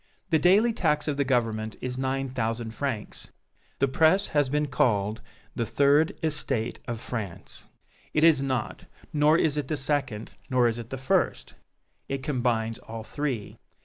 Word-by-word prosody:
The 160 - +4
daily 205 +8 +5
tax 150 -8 +1
of 145 -2 -1
the 140 - +2
Government 115 -4 0
is 125 0 -4
nine 135 +1 -1
thousand 115 -2 -3
francs. 120 -6 -4 0.5
The 140 - +2
press 160 +8 +3
has 145 -3 +2
been 150 +2 +1
called 110 -6 +1 0.3
the 120 - 0
Third 140 +7 +3
Estate 140 -7 -1
of 120 -2 -3
France. 110 -8 -6 0.5
It 155 - +1
is 160 -4 +6
not! 130 -5 -3 0.3
Nor 150 +1 +4
is 150 -3 +1
it 145 -3 -2
the 155 - -1
second 135 -6 -2 0.2
nor 125 -2 +4
is 115 0 -1
it 115 -1 -8
the 135 - -4
first! 130 +1 0 0.6
It 135 -1 -3
combines 120 -6 0
all 115 0 -8
three. 130 -5 -4
130 Hz, 160 wpm, -27 LUFS, 115-150 Hz, 0.6 s, is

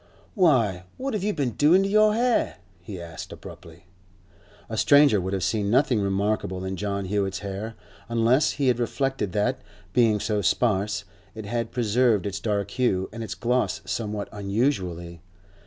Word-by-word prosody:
'Why, 115 - +2
what 270 0 -3
have 210 - -1
you 210 - +1
been 140 -9 -1
doing 165 - +4
to - - 0
your 215 +1 +4
hair?' 245 +1 +1 0.3
he 95 +1 -8
asked 85 -1 -8
abruptly. 85 +1 -12 0.8
A 110 - -5
stranger 140 -3 +5
would 95 +2 -3
have 95 -2 -1
seen 100 +2 0
nothing 125 0 +3
remarkable 100 -1 -1
in 95 0 -3
John 100 +1 -3
Hewett's 100 0 -1
hair, 100 +3 -5 0.3
unless 115 +5 +3
he 140 -3 -1
had 120 -1 +1
reflected 135 -3 -1
that, 125 +6 0 0.3
being 115 -4 +3
so 105 0 -1
sparse, 105 -2 +1 0.3
it 110 -1 -7
had 115 +2 -3
preserved 115 -3 +2
its 100 -1 -3
dark 100 -2 -2
hue 95 -6 0
and 115 0 -5
its 110 - -5
gloss 125 +1 0
somewhat 105 -2 -3
unusually. 100 - -2
110 Hz, 160 wpm, -25 LUFS, 100-125 Hz, 0.8 s, stranger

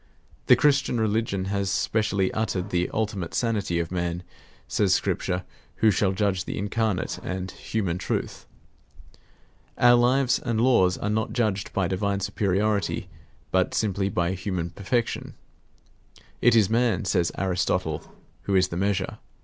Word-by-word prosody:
The - - +8
Christian 140 -4 +2
religion 110 -3 0
has 100 0 -1
specially 100 -1 0
uttered 100 -3 -2
the 90 0 0
ultimate 105 -6 -2
sanity 105 -7 0
of 85 0 -3
Man, 85 -1 -2 0.4
says 95 -3 +2
Scripture, 90 -1 -1 0.3
who 110 - +4
shall 100 0 +1
judge 95 -1 0
the - - -4
incarnate 105 -1 -1
and 95 0 -4
human 95 -6 -3
truth. - - -3 1.3
Our 120 0 +6
lives 125 +2 +3
and 115 -2 -2
laws 115 -7 +4
are 105 - -3
not 110 +1 -1
judged 105 -5 -1
by 95 -3 0
divine 100 +2 -1
superiority, 100 +1 0 0.4
but 95 -1 +1
simply 100 -2 0
by 85 -2 0
human 90 -2 -3
perfection. 115 +6 -2 1.1
It 120 0 +5
is 110 -4 +5
man, 115 -4 +1
says 90 -2 +1
Aristotle, 90 -4 0 0.4
who 100 - +1
is 95 0 +3
the 85 - -4
measure. 95 0 -1
100 Hz, 140 wpm, -25 LUFS, 90-110 Hz, 1.3 s, The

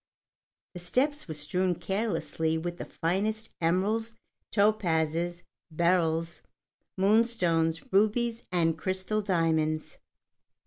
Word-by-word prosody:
The 180 - -7
steps 275 - 0
were 155 - -5
strewn 180 +5 0
carelessly 190 -5 -1
with 175 +2 -4
the - - -4
finest 215 +6 -2
emeralds, 210 +7 0 0.4
topazes, 175 -5 +1 0.3
beryls, 165 0 +1 0.6
moonstones, 185 -6 +2
rubies, 225 +3 +2
and 165 -2 +1
crystal 190 +4 -1
diamonds. 160 -5 0
180 Hz, 90 wpm, -28 LUFS, 165-215 Hz, 0.6 s, moonstones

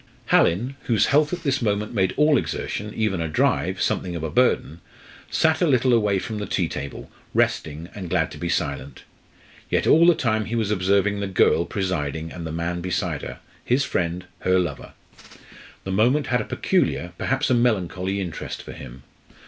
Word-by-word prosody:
Hallin, 120 +11 +3
whose 115 -4 +3
health 150 +1 +3
at 175 -1 -4
this 140 -2 0
moment 105 -1 -1
made 95 -4 +1
all 150 0 +5
exertion, 105 -4 -2
even 105 -5 0
a 80 - -1
drive, 75 - +1
something 90 -1 -1
of 80 - -4
a 80 - -3
burden, 80 +3 +1 0.5
sat 160 0 +2
a 175 - +4
little 130 -3 +3
away 105 -4 +3
from 110 +2 -4
the 105 - -4
tea 90 - 0
table, 70 -3 -7 0.2
resting, 80 +2 0
and 95 -4 -7
glad 80 -3 +1
to 75 - -9
be 85 - -3
silent. 70 -5 -3 0.7
Yet - - +1
all 170 +2 +6
the 175 - +6
time 110 -5 0
he 115 - -3
was 110 -3 0
observing 100 +1 +2
the 100 - -2
girl 90 -2 +3
presiding 80 -6 -3
and 85 -2 -6
the - - -5
man 85 +2 -3
beside 90 0 -2
her - - -8 0.2
his 130 +3 +2
friend, 90 +1 -2
her 95 0 +2
lover. 85 -7 -3 0.9
The 95 - -4
moment 125 +9 +3
had 125 +1 +1
a - - -5
peculiar, 85 0 0
perhaps 135 +1 0
a - - +5
melancholy 100 -5 0
interest 90 -4 -5
for - - -9
him. 65 0 -10
100 Hz, 185 wpm, -23 LUFS, 85-120 Hz, 0.9 s, all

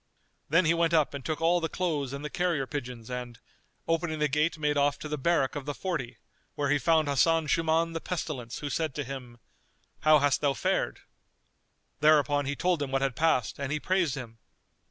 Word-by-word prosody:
Then 165 +4 +4
he 160 - +4
went 170 0 +2
up 155 -3 +2
and 140 -2 -6
took 155 0 -3
all 170 +2 +3
the 165 - -1
clothes 150 -8 -2
and 140 +2 -6
the - - -3
carrier 175 -7 0
pigeons 125 -5 -6
and, 125 -2 -6 0.5
opening 165 -1 0
the 150 0 +2
gate 150 +4 +1
made 150 -1 0
off 145 0 +2
to - - -7
the 150 - -2
barrack 150 -1 +1
of 145 -1 -5
the 145 - -3
Forty, 165 -10 -4 0.4
where 145 -1 0
he 145 - +3
found 160 0 +3
Hasan 160 +3 +3
Shuman 165 +2 +1
the 165 - -4
Pestilence 135 -9 -4
who 145 - -3
said 160 -4 -1
to 145 - -2
him, 125 -3 -8 0.6
"How 155 0 +6
hast 145 -1 +2
thou 145 -2 +2
fared?" - - -1 1.0
Thereupon 145 -2 +4
he 140 - -1
told 175 0 0
him 140 - -2
what 135 0 0
had 135 -3 0
passed 155 -7 +1
and 140 -1 -3
he 150 - 0
praised 180 -5 +1
him. 115 -4 -8
150 Hz, 205 wpm, -28 LUFS, 135-165 Hz, 1.0 s, How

